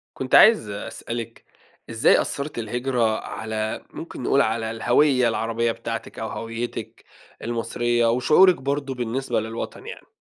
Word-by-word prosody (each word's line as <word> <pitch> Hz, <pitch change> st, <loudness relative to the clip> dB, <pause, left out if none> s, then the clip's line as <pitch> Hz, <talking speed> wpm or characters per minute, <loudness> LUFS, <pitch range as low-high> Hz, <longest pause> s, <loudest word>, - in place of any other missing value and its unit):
كنت 130 Hz, 0 st, 0 dB
عايز 215 Hz, -, +7 dB
أسألِك 115 Hz, +3 st, -6 dB, 0.4 s
إزاي 115 Hz, +5 st, +4 dB
أثّرِت 140 Hz, 0 st, -4 dB
الهجرة 120 Hz, -1 st, 0 dB
على 110 Hz, 0 st, -4 dB
ممكن -, -, -8 dB
نقول -, -, +3 dB
على 110 Hz, 0 st, -1 dB
الهويّة 125 Hz, +3 st, +3 dB
العربية 115 Hz, +1 st, 0 dB
بتاعتِك -, -, -6 dB
أو -, -, -3 dB
هويّتِك 115 Hz, +1 st, -6 dB, 0.4 s
المصرية 120 Hz, +1 st, 0 dB
وشعورِك 155 Hz, +10 st, +5 dB
برضه 140 Hz, 0 st, -3 dB
بالنسبة 125 Hz, +2 st, -2 dB
للوطن 110 Hz, +1 st, -6 dB
يعني؟ -, -, -9 dB
120 Hz, 125 wpm, -23 LUFS, 115-130 Hz, 0.4 s, عايز